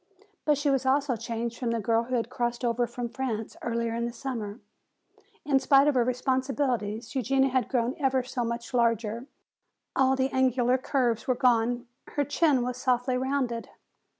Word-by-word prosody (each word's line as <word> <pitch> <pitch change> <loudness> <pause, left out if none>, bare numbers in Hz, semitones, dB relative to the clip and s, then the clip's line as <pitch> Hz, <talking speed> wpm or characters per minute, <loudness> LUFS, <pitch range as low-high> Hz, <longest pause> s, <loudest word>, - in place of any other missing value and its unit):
But 300 -2 +3
she 290 0 +1
was 270 -1 +1
also 270 0 +2
changed 230 +1 -4
from 245 - -1
the 230 0 0
girl 225 +2 +1
who 255 +1 -2
had 230 - -1
crossed 240 0 -2
over 240 0 +1
from 240 +1 -4
France 230 -3 -4
earlier 230 -1 -1
in 235 +1 -1
the - - -4
summer. 230 -4 -5 0.9
In 275 -2 +3
spite 275 +1 +5
of 295 - +4
her 250 -2 +3
responsibilities 250 -3 -1
Eugenia 270 +1 +2
had 260 -1 +1
grown 245 -1 +1
ever 265 -2 +2
so 250 -1 -3
much 235 +1 -4
larger; 230 0 +1 0.7
all 265 0 +4
the 265 0 0
angular 255 -1 +2
curves 245 -4 0
were 255 - +2
gone, 245 -1 +2 0.3
her 290 - +1
chin 290 -2 +2
was 250 0 -3
softly 250 0 +1
rounded. 255 -3 -1
250 Hz, 175 wpm, -27 LUFS, 235-265 Hz, 0.9 s, spite